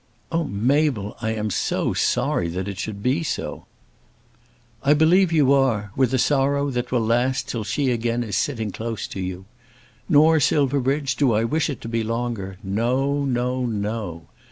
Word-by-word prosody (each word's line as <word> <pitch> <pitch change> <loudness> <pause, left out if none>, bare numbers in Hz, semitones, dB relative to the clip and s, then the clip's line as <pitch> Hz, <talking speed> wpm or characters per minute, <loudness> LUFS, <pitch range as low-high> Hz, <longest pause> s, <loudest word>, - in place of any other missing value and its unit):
"Oh, 165 0 0
Mabel, 125 -1 0
I 110 -1 -1
am 105 -1 -2
so - - 0
sorry 85 - +1
it 95 0 -4
should 100 0 -5
be 130 +6 +1
so." 160 - -4 1.1
"I 145 +2 +4
believe 170 +4 +4
you 145 -4 +4
are, 115 -7 +1
with 130 -2 +2
a 130 - +2
sorrow 140 +1 +1
that 125 -1 -3
will 120 -3 +1
last 120 +3 +1
till 115 -3 -3
she 135 +5 0
is - - +2
again 120 +1 -1
sitting 110 +1 -1
close 115 0 -4
to - - -6
you. 95 0 -5 0.6
Nor, 160 0 +5
Silverbridge, 140 -1 +1
do 130 -4 +3
I 110 +1 +2
wish 155 +7 0
it 140 - -5
to - - -7
be 115 0 -1
longer. 115 -4 -3
No; 130 +8 0
no; 125 0 -1
no. 105 -6 -3
120 Hz, 165 wpm, -23 LUFS, 110-140 Hz, 1.1 s, Nor